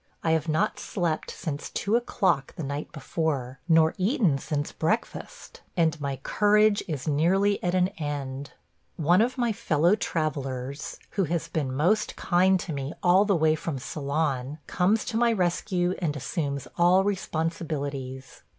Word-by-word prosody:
I 160 - +2
have 160 0 +1
not 160 +7 +1
slept 170 -5 -2
since 145 -3 -5
two 205 +3 0
o'clock 190 - +1
the 165 - -5
night 140 +2 -4
before, 140 -4 -2
nor 160 -1 +5
eaten 185 - +2
since 145 +1 -3
breakfast, 215 +9 -3 0.2
and 160 -2 +2
my 140 -1 -2
courage 210 0 +3
is 155 -3 -4
nearly 190 +7 +2
at 180 0 +1
an 185 0 +3
end. 140 -2 -4 0.4
One 175 +5 +4
of 250 +4 0
my 240 -2 +1
fellow 170 -1 +2
travellers, 140 -7 -3
who 195 - +1
has 165 0 -2
been 150 -5 -1
most 180 +11 +1
kind 185 +1 +3
to 165 - -5
me 140 +1 -4
all 185 +3 +5
the 200 -2 +2
way 160 -1 +3
from 155 -2 -3
Ceylon, 140 0 -2
comes 200 +4 +1
to 225 - -2
my 235 0 +4
rescue 180 -2 0
and 160 -5 -1
assumes 140 -1 -3
all 180 +2 +5
responsibilities. 150 -8 -3
160 Hz, 150 wpm, -26 LUFS, 145-185 Hz, 0.4 s, nor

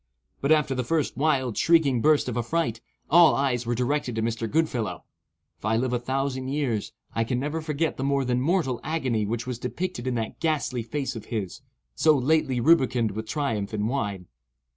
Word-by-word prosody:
But 140 - +1
after 150 -3 +3
the 125 -1 -1
first 155 +3 0
wild, 135 -5 +1
shrieking 150 -8 +4
burst 150 0 +3
of 125 - -3
affright, 120 -1 -1 0.3
all 170 0 +6
eyes 125 -4 0
were 120 - 0
directed 125 0 -1
to 110 - -1
Mr. 115 0 -2
Goodfellow. 140 -7 -1 0.6
If - - -29
I 110 +2 +1
live 125 +1 0
a 120 - +1
thousand 130 +1 -2
years, 125 -7 -1 0.2
I 115 - +1
can 125 +2 -1
never 150 +4 -2
forget 155 +1 -1
the 130 - -3
more 140 -1 +1
than 125 0 +1
mortal 150 -5 +1
agony 130 -10 -1
which 115 +1 -2
was 125 -2 -4
depicted 130 0 -4
in 125 - 0
that 115 -2 -4
ghastly 150 -6 0
face 130 +3 -3
of 110 - -7
his, 100 -6 -4 0.3
so 155 -2 +4
lately 135 -1 +2
rubicund 125 -5 +3
with 110 +2 -5
triumph 110 -8 -2
and 105 0 0
wine. 105 -8 -2
130 Hz, 190 wpm, -26 LUFS, 115-150 Hz, 0.6 s, all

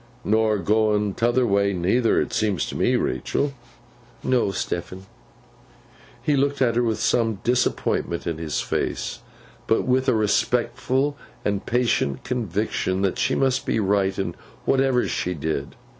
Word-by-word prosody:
'Nor 110 0 +2
going 105 0 +1
t'other 120 +3 +2
way, 100 -2 +2
neither, 100 +7 +2
't - - -12
seems 105 -5 +1
to - - -6
me, - - +2
Rachael?' 140 -1 -1 0.7
'No, 125 -5 +2
Stephen.' 95 0 -4 1.2
He 150 - +2
looked 140 +1 +1
at 120 -3 +2
her 120 - +3
with 115 -3 0
some 115 0 +2
disappointment 120 -7 0
in 85 -2 -3
his 80 -3 -2
face, - - -2 0.5
but 115 - +2
with 130 +1 +2
a 125 - +3
respectful 125 +6 +1 0.3
and 100 -1 0
patient 120 - +1
conviction 105 -5 -1
that 95 - 0
she - - +1
must 135 -2 +1
be - - +1
right 95 -1 +1
in 90 -3 -2 0.3
whatever 135 -2 +2
she 90 0 -2
did. 75 -2 -3
110 Hz, 145 wpm, -23 LUFS, 95-125 Hz, 1.2 s, her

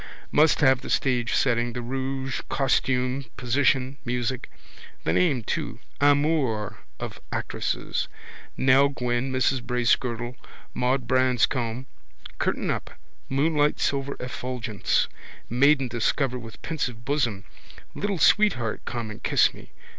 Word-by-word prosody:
Must 155 +1 +4
have 130 -3 +5
the - - -8
stage 125 -3 +1
setting, 120 -2 +1
the 125 - -4
rouge, 130 +1 -3
costume, 130 0 +1
position, 135 +1 +1
music. 125 +1 -2 0.5
The 80 - +1
name 140 - +2
too. - - -3 0.2
Amours 145 -7 +2 0.3
of - - -6
actresses. - - -2 0.5
Nell 135 +2 +5
Gwynn, 125 -1 -1
Mrs 130 0 +1
Bracegirdle, 120 0 0 0.4
Maud 125 0 0
Branscombe. 125 -1 +1 0.5
Curtain - - 0
up. - - -3 0.4
Moonlight 150 +2 +2
silver 140 0 -1
effulgence. 125 -4 -1 0.4
Maiden 135 +2 +4
discovered 125 +2 0
with 115 -2 -11
pensive 125 -8 -3
bosom. 125 -8 0 0.5
Little 200 -2 -2
sweetheart 165 - +3
come 115 -3 -4
and 110 +2 -10
kiss - - +3
me. - - -13
130 Hz, 115 wpm, -25 LUFS, 120-140 Hz, 0.5 s, have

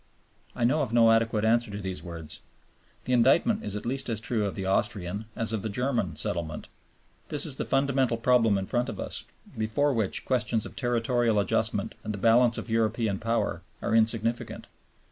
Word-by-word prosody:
I - - -2
know 140 +6 +3
of 130 - -2
no 115 -1 +5
adequate 115 -1 +2
answer 115 +1 +2
to 100 - -5
these 95 -2 -5
words. 85 -3 -7 0.7
The 125 - -1
indictment 165 - +3
is 100 - -3
at 105 - -5
least 135 +2 -2
as 110 -2 -1
true 115 -2 -1
of 100 - -5
the 95 - -4
Austrian, 95 +1 -1
as 115 -1 -2
of 110 - -1
the 110 - -3
German, 115 - -1
settlement. 80 +1 -2 0.6
This 150 - +3
is 140 -4 0
the - - -2
fundamental 135 -3 +1
problem 115 -3 +3
in 95 - -2
front 120 +4 -1
of 105 - -6
us, - - -5 0.3
before 110 +7 +1
which 110 -5 -1
questions 120 -3 0
of - - -10
territorial 120 -2 +1
adjustment 100 - 0
and 105 - -3
the - - -6
balance 115 +3 +4
of - - -5
European 110 -2 0
power 115 +1 -1 0.2
are - - -2
insignificant. 115 +1 +1
115 Hz, 185 wpm, -27 LUFS, 105-120 Hz, 0.7 s, no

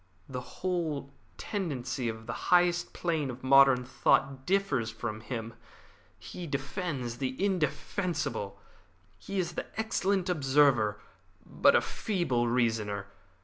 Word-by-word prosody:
The 125 -1 -5
whole 155 -3 -3 0.3
tendency 130 - -3
of 110 0 -7
the - - -4 0.2
highest 175 -1 +4
plane 160 -5 -1
of 125 +1 -7
modern 135 -1 +6
thought 135 +1 +1
differs 180 - +1
from 110 -1 -5
him. 115 0 -5 0.6
He 175 -2 -8
defends 140 - -3
the 130 -1 -2
indefensible. 170 - -1 0.6
He 200 - -5
is 175 -2 -1
an - - -2
excellent 200 -3 0
observer, 135 - +3 0.5
but - - +4
a - - +5
feeble 170 - -1
reasoner. 110 -4 0
135 Hz, 115 wpm, -30 LUFS, 120-175 Hz, 0.6 s, modern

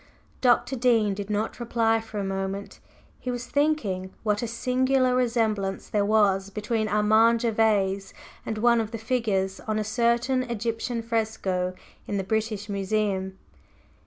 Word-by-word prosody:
Dr. 250 +1 +3
Dean 230 -5 +3
did 200 +1 -6
not 210 +3 -2
reply 225 -1 +1
for 220 -1 -8
a 200 - -1
moment; 195 +1 -4 0.4
he 255 - -5
was 245 0 -3
thinking 255 -12 0
what 210 -2 +1
a 235 - -2
singular 255 +2 +1
resemblance 220 -6 0
there 205 -1 +1
was 200 -2 +2
between 215 +2 -2
Armand 220 +2 +4
Gervase 210 -4 +1 0.3
and 220 - -4
one 235 +1 +4
of 220 - -4
the 230 - -5
figures 220 -5 -1
on 215 0 0
a 215 - 0
certain 235 +3 +1
Egyptian 230 0 -3
fresco 215 -5 -1 0.3
in 205 - -2
the 195 - -1
British 215 0 -2
Museum. 195 -1 -1
220 Hz, 145 wpm, -26 LUFS, 200-235 Hz, 0.4 s, Armand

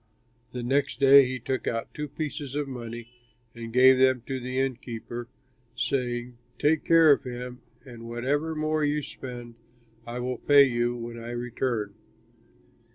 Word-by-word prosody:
The 125 -1 -5
next 135 0 0
day 140 0 +8
he 130 +1 -3
took 130 +2 -3
out 115 -1 -3
two 150 0 -4
pieces 145 -1 -5
of 145 -1 -1
money 120 -3 -7 0.5
and 115 -1 -8
gave 130 +2 +6
them 130 -2 +3
to 135 -1 -3
the 125 +1 -5
inn 135 -2 0
keeper, 120 0 -7 0.5
saying, 120 -2 -2 0.2
'Take 150 +1 +2
care 165 -2 +6
of 140 - +3
him, 125 -1 -7 0.2
and 115 -3 -10
whatever 145 +7 -1
more 155 0 0
you 150 0 0
spend 120 -3 -8 0.5
I 120 +1 -5
will 125 0 -3
pay 145 -1 +6
you 120 -2 0
when 115 0 -7
I 115 - -7
return.' 120 -3 -3
125 Hz, 160 wpm, -27 LUFS, 120-140 Hz, 0.5 s, day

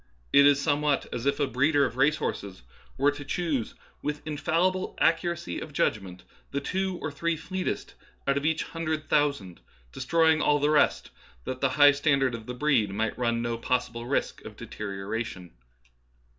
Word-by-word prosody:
It 140 0 +8
is 145 -1 +4
somewhat 145 -1 +1
as 120 +3 -3
if 140 - +1
a 145 - +3
breeder 140 +2 +2
of - - -4
race 140 +4 +3
horses 100 - -5 0.3
were 140 +2 +3
to 145 0 -8
choose, 145 -4 -2 0.3
with 150 0 -4
infallible 170 +5 0
accuracy 165 - 0
of - - -8
judgmentj 95 -4 -1 0.3
the 140 - -2
two 190 +5 -2
or 155 - -2
three 165 +3 -1
fleetest 185 +3 -4 0.3
out 140 - +3
of 140 - -1
each 160 +1 +1
hundred 155 -2 -4
thousand, 140 -12 0 0.3
destroying 160 - +2
all 145 - +3
the 145 +1 +1
rest, 150 - +2 0.3
that 130 - -5
the 135 - +3
high 145 -1 +8
standard 140 -3 +1
of 115 -1 -7
the 125 - -5
breed 125 -6 +2
might 110 +3 -2
run 115 -1 0
no 115 -1 -2
possible 120 -1 -2
risk 140 - -1
of - - -10
deterioration. 100 -2 -5
140 Hz, 170 wpm, -27 LUFS, 120-155 Hz, 0.3 s, It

